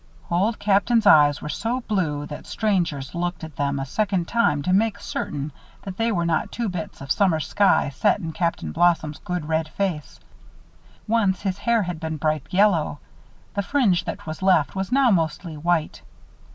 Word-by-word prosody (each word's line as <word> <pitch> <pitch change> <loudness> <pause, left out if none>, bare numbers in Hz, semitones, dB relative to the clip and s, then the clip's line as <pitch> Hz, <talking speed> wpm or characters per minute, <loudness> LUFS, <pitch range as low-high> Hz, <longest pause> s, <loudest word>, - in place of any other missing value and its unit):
Old 200 +6 +1
Captain's 210 +3 +2
eyes 145 -6 +6
were 150 - -4
so 230 - -2
blue 160 -10 -1
that 150 - -9
strangers 170 -11 -1
looked 175 0 -3
at 160 -3 -8
them 140 -1 0
a 135 - -3
second 190 +3 -1
time 150 -12 +1
to 185 - +1
make 210 +1 +2
certain 145 -5 -4 0.3
that 190 -2 -7
they 230 +1 +1
were 170 -5 0
not 165 -2 0
two 235 -3 -2
bits 175 -6 -6
of 135 0 -5
summer 185 -6 +3
sky 195 -1 +2
set 170 +10 +1
in 165 -4 -5
Captain 160 - -2
Blossom's 155 - +1
good, 180 -4 -4
red 160 0 0
face. 170 -3 -3 0.9
Once 210 -4 +1
his 195 -1 -2
hair 230 0 +2
had 175 -3 -4
been 160 -1 -4
bright 155 -2 -1
yellow. 180 -6 +2 0.6
The 200 - 0
fringe 200 -5 +1
that - - -6
was 155 +1 -6
left 185 -5 +3
was 190 +2 -3
now 265 -2 +4
mostly 165 -2 -1
white. 165 +1 -1
175 Hz, 180 wpm, -23 LUFS, 155-205 Hz, 0.9 s, eyes